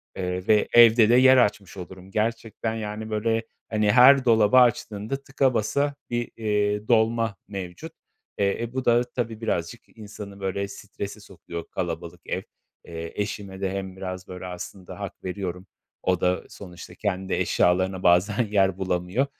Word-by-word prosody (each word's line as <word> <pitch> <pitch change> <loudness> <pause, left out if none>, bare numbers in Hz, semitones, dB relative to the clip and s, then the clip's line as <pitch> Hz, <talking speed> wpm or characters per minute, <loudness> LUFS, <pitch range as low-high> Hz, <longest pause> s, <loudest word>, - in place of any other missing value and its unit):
Eee, 90 0 -3
ve 105 -1 +4
evde 115 -1 +7
de 120 - +6
yer 130 +1 +7
açmış 100 -5 +1
olurum. 95 +1 -10
Gerçekten, 110 +1 -2
yani, 110 0 -5
böyle, 115 +1 0 0.3
hani, 105 -1 +2
her 130 +2 +7
dolabı 115 0 +5
açtığında 120 +1 +2
tıka 135 -1 +1
basa 140 +6 0
bir, 120 0 -2
eee, 105 -1 0
dolma 115 -2 +2
mevcut. 90 -4 -7 0.5
Eee, 100 +3 0
e, 120 +1 -6
bu 130 -1 -3
da 120 0 +4
tabii 120 -2 -5
birazcık 115 +2 -4
insanı, 100 -2 -9
böyle, 100 +1 -2
strese 100 - -8
sokuyor 85 0 -9
kalabalık 85 -1 -4
ev. - - -2 0.4
Eee, 85 -1 -7
eşime 100 -1 -5
de 95 -1 -1
hem 95 -1 -5
biraz, 95 -1 -6
böyle, 90 0 -8
aslında 90 +1 -8
hak - - -7
veriyorum. 90 -1 -5 0.4
O 90 -2 +1
da 90 0 +1
sonuçta 90 -3 -11
kendi 95 -2 -2
eşyalarına 95 +1 +1
bazen 95 +6 +4
yer 95 -3 +2
bulamıyor. 95 +6 0
105 Hz, 150 wpm, -25 LUFS, 95-115 Hz, 0.5 s, evde